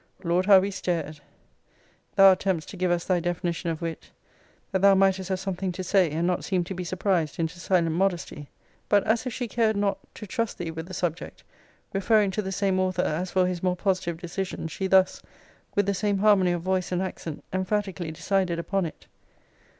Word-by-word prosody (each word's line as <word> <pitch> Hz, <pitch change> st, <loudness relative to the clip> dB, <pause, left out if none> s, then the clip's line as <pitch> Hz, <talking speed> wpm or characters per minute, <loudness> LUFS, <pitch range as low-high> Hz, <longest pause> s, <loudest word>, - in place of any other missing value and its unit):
Lord, 180 Hz, +2 st, +1 dB
how 200 Hz, -2 st, +9 dB
we 195 Hz, +2 st, -1 dB
stared! 165 Hz, -5 st, -3 dB, 1.0 s
Thou 195 Hz, -1 st, +8 dB
attemptedst 185 Hz, -4 st, -1 dB
to -, -, -8 dB
give 185 Hz, -1 st, 0 dB
us 175 Hz, 0 st, 0 dB
thy 185 Hz, -2 st, +2 dB
definition 175 Hz, 0 st, -2 dB
of 165 Hz, 0 st, -4 dB
wit, 165 Hz, -1 st, -5 dB, 0.6 s
that 190 Hz, -2 st, 0 dB
thou 200 Hz, 0 st, +6 dB
mightest 190 Hz, -1 st, +2 dB
have 190 Hz, -1 st, -1 dB
something 190 Hz, -1 st, -3 dB
to 185 Hz, +1 st, -5 dB
say, 185 Hz, -2 st, +3 dB
and 160 Hz, +3 st, -1 dB
not 180 Hz, 0 st, 0 dB
seem 185 Hz, -2 st, 0 dB
to 180 Hz, -, -6 dB
be 180 Hz, 0 st, -4 dB
surprised 175 Hz, -3 st, -1 dB
into 165 Hz, +1 st, -3 dB
silent 170 Hz, -2 st, +1 dB
modesty. 175 Hz, -6 st, -1 dB, 0.4 s
But 205 Hz, -1 st, +4 dB
as 230 Hz, +3 st, +1 dB
if 250 Hz, -, -3 dB
she 245 Hz, +1 st, -3 dB
cared 220 Hz, -2 st, +1 dB
not 200 Hz, -1 st, 0 dB, 0.2 s
to 215 Hz, -, -8 dB
trust 230 Hz, +3 st, -2 dB
thee 170 Hz, -2 st, -4 dB
with 160 Hz, +1 st, -7 dB
the 185 Hz, -, -7 dB
subject, 170 Hz, -2 st, -4 dB, 0.5 s
referring 200 Hz, +1 st, +3 dB
to 200 Hz, -, -1 dB
the 190 Hz, -1 st, -5 dB
same 195 Hz, -1 st, +1 dB
author 185 Hz, -1 st, +1 dB
as 175 Hz, +4 st, -1 dB
for 185 Hz, 0 st, +2 dB
his 180 Hz, -1 st, -2 dB
more 180 Hz, -1 st, +1 dB
positive 185 Hz, -2 st, -1 dB
decision, 175 Hz, 0 st, -4 dB
she 190 Hz, +4 st, -3 dB
thus, 190 Hz, 0 st, +3 dB, 0.5 s
with 205 Hz, -, +3 dB
the 200 Hz, -, +1 dB
same 205 Hz, +1 st, 0 dB
harmony 195 Hz, -3 st, +4 dB
of 170 Hz, -1 st, -3 dB
voice 185 Hz, -1 st, -1 dB
and 180 Hz, +1 st, 0 dB
accent, 165 Hz, -4 st, -6 dB
emphatically 185 Hz, -3 st, -2 dB
decided 180 Hz, +1 st, 0 dB
upon 190 Hz, +1 st, -1 dB
it. -, -, -12 dB
185 Hz, 200 wpm, -26 LUFS, 175-195 Hz, 1.0 s, how